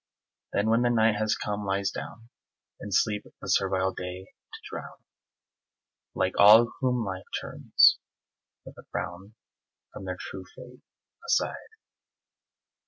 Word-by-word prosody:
Then 105 +2 +1
when 115 +1 +3
the 120 - +2
night 110 -2 +3
has 110 0 +1
come 105 0 -4
lies 100 0 -1
down, 115 +1 -9 0.5
In 105 - -8
sleep 105 +2 +1 0.2
the - - -9
servile 95 0 +1
day 90 +1 -6
to - - -16
drown - - -8 1.2
Like 95 - 0
all 110 +3 +8
whom 125 -3 0
Life 95 -1 -6
turns - - +4 0.7
with - - -12
a - - -12
frown 95 +4 -6 0.6
From 95 - -9
their 90 -1 -4
true 95 -1 -8
fate 125 -1 -13 0.5
aside. - - +2
105 Hz, 130 wpm, -27 LUFS, 95-115 Hz, 1.2 s, all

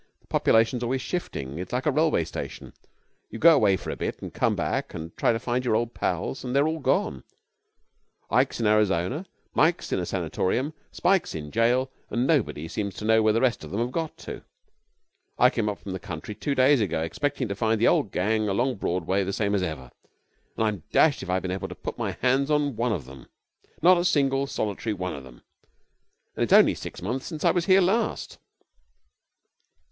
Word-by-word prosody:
The - - -31
population's 115 +2 +3
always 130 +2 -1
shifting. 75 - -4
It's 90 - -6
like 125 +1 -1
a 150 - +3
railway 150 - +2
station. - - -7 0.6
You - - -7
go 170 +1 +7
away 105 -8 +3
for - - -6
a - - -4
bit - - -4
and - - -7
come - - +1
back - - -2
and 80 0 -7
try - - +2
to 115 - 0
find 125 +2 -2
your 120 -3 +1
old 120 +1 -1
pals, 135 - -2
and 125 0 -3
they're 140 +2 +4
all 160 0 -2
gone: 170 +9 0 1.1
Ike's - - +2
in 115 - 0
Arizona, 105 - +1 0.3
Mike's 165 +3 +2
in - - +1
a 90 - -2
sanatorium, 95 - -1 0.2
Spike's 190 - +1
in 75 -2 -6
jail, 125 +3 +2 0.2
and 120 +2 0
nobody 125 - 0
seems 100 +3 -4
to 105 - -6
know 110 0 +4
where 110 0 +4
the 115 - +1
rest 125 -8 +1
of 75 - -8
them 100 - -3
have 120 +1 -1
got 160 +2 -3
to. - - -8 0.9
I 125 +1 +5
came 110 -3 -1
up 105 - -4
from 100 - -8
the 95 - -4
country 95 0 -7
two 140 +6 -2
days 130 0 +4
ago, 85 -6 -1
expecting 135 - -2
to 100 - -2
find 110 +1 +1
the 115 - +4
old 100 - +2
gang 110 +3 0
along 120 +5 0
Broadway 95 +1 0
the 95 - -3
same 100 0 -1
as 100 - +1
ever, 75 -8 -5 0.7
and 110 - +1
I'm 105 -7 -2
dashed 155 -3 +4
if 95 - -7
I've 95 +1 0
been 90 - -3
able 95 0 -3
to - - -8
put - - -7
my - - -2
hands 135 +3 +2
on 145 -3 +1
one 120 +2 0
of 85 - -3
them! 65 0 -13 0.6
Not 180 +1 +7
a - - 0
single, 140 -5 +2
solitary 110 -3 -2
one 90 -1 -3
of 70 - -8
them! 65 -2 -15 0.9
And - - 0
it's - - +1
only - - +7
six - - -8
months 130 +2 -3
since 155 -3 -5
I - - +6
was 175 0 -1
here 190 0 +6
last.' 195 +6 0
115 Hz, 210 wpm, -26 LUFS, 95-135 Hz, 1.1 s, go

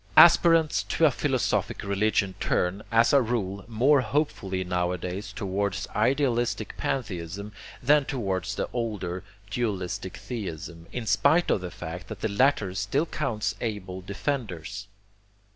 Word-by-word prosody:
Aspirants 165 -2 +7
to - - +1
a - - +6
philosophic - - 0
religion 100 -1 +1
turn, 90 +3 0
as 115 +3 +4
a 140 - +7
rule, 100 -5 -2
more 130 +5 +4
hopefully 105 -7 -1
nowadays 90 +2 -2
towards 100 -2 -2
idealistic 125 -4 +1
pantheism 100 -4 -3 0.3
than 145 +2 +5
towards 95 - -2
the - - -2
older 100 -6 -3 0.3
dualistic 95 -4 -2
theism, 85 -8 -6
in 125 -2 -4
spite 140 - +3
of 100 - +2
the 90 - -4
fact 90 +1 -7
that 110 -3 -8
the 110 - 0
latter 105 -3 +2
still 135 - 0
counts 115 -10 -2
able 95 -5 -4
defenders. 100 - -4
105 Hz, 125 wpm, -27 LUFS, 95-125 Hz, 0.3 s, Aspirants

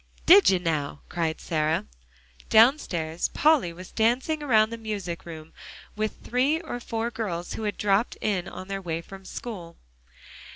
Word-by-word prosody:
"Did 385 +4 +8
you, 190 - +4
now?" 155 -5 -2
cried 165 -2 -2
Sarah. 155 -1 0 0.6
Downstairs 190 - +3
Polly 300 - +4
was 180 +2 -11
dancing 250 +8 +1
around 220 -6 +3
the 230 - -5
music 200 -7 -5
room 160 -1 -9 0.4
with 215 0 -3
three 265 +6 +1
or 315 -8 -6
four 230 0 -3
girls 185 -7 -4
who 220 - -4
had 205 - -2
dropped 205 +3 +1
in 195 -4 -1
on 185 - -8
their 195 0 -4
way 165 -2 -3
from 195 +2 -12
school. 180 -9 -7
200 Hz, 155 wpm, -26 LUFS, 170-235 Hz, 0.6 s, Did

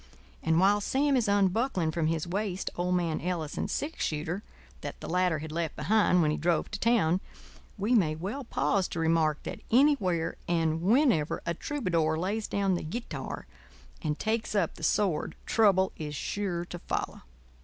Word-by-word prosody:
And 160 +1 +2
while 200 +2 +4
Sam 275 +6 +2
is 240 -4 +2
unbuckling 200 -2 +2
from 160 -1 0
his 160 0 0
waist 195 0 -2
old 180 +1 0
man 170 -3 0
Ellison's 170 -4 -2
six 310 +3 -2
shooter, 160 +5 -2 0.4
that - - -6
the - - -7
latter 180 -1 +2
had 155 0 -6
left 165 -1 -2
behind 205 -5 +3
when 150 - +2
he - - -1
drove 170 +1 0
to - - -4
town, 195 -7 +3 0.6
we 210 +5 +1
may 170 -10 +3
well 200 - -4
pause 200 -5 0
to 170 - -5
remark 160 -2 +2
that - - -6
anywhere 205 - +3
and 165 -2 +1
whenever 215 - +2
a 170 - 0
troubadour 170 - 0
lays 205 +6 -1
down 200 -1 +1
the 175 - -1
guitar 225 +10 -5 0.6
and 150 -1 -1
takes 220 0 -1
up 185 -6 +1
the - - -14
sword 165 0 +1
trouble 195 -4 +3
is 150 -1 -5
sure 175 +1 -2
to 175 0 -7
follow. - - -3
180 Hz, 170 wpm, -29 LUFS, 160-210 Hz, 0.6 s, while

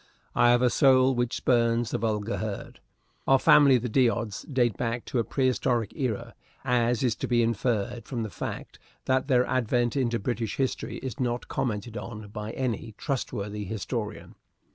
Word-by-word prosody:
I 120 - +4
have 120 +1 +4
a 125 - +4
soul 130 -1 +5
which 120 -1 -1
spurns 115 -2 +2
the - - -1
vulgar 110 0 -1
herd. 105 -2 -5 0.5
Our 135 - +6
family, 140 -1 +6
the 120 +1 -3
D'Odds, 115 -3 +1
date 120 -5 +2
back 115 0 -3
to 125 - -1
a - - +2
prehistoric 125 -3 0
era, 120 -3 -3 0.3
as 120 -2 +2
is 120 -3 +2
to - - -3
be 120 -1 +3
inferred 115 0 -1
from 120 -4 -3
the 110 - -5
fact - - -6 0.3
that 130 0 +1
their 125 -3 +3
advent 120 -1 0
into 120 -4 +1
British 115 0 -3
history 135 -2 -2
is 130 +1 -5
not 120 -1 -1
commented 115 -3 -3
on 110 -3 -7
by 105 +1 -6
any 115 -4 -3
trustworthy 105 -7 -3
historian. 105 +2 -5
120 Hz, 165 wpm, -27 LUFS, 110-130 Hz, 0.5 s, Our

